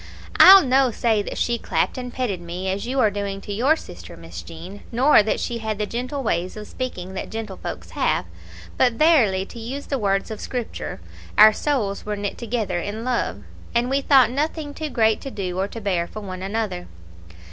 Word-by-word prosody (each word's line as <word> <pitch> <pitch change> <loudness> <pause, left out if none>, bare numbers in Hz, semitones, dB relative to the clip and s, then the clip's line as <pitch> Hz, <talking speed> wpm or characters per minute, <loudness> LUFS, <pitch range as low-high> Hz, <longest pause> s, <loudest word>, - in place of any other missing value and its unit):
I'll 385 0 +10
no 260 0 +4
say 225 -2 +1
that - - -6
she 235 -1 0
clapped - - 0
and 250 -1 -5
petted 220 -9 -2
me 175 +2 -5
as 200 +4 -3
you 265 +2 -1
are 220 -5 +4
doing 200 -1 -3
to 205 - -6
your 260 +9 +3
sister, 85 - -11
Miss 85 0 -9
Jean, 170 - -10
nor 255 +2 +5
that 215 - -1
she 235 -1 -3
had 220 -2 -3
the 210 - -1
gentle 255 +5 -4
ways 180 -2 -1
of 210 - -7
speaking 190 -7 -5
that 190 - -5
gentlefolks 220 -3 -6
have; - - 0 0.5
but 250 -2 +4
verily 230 - +3
to 235 - -11
use 260 +5 -5
the 275 - -2
words 195 0 0
of 215 - -6
Scripture, 245 -3 -5 0.4
'our 215 +1 +9
souls 215 -8 -1
were 210 0 -3
knit 205 -1 -4
together 220 -6 -2
in 205 +5 -5
love,' 235 - -2 0.3
and 240 +2 +1
we 275 +1 +2
thought 265 -4 +5
nothing 295 +2 -2
too 310 +1 -4
great 220 -4 +2
to 275 - -6
do 185 -6 -4
or 195 - 0
to 230 - -8
bear 185 -5 -1
for 215 - -8
one 185 -2 -7
another. 195 -2 -3
220 Hz, 200 wpm, -23 LUFS, 195-255 Hz, 0.5 s, I'll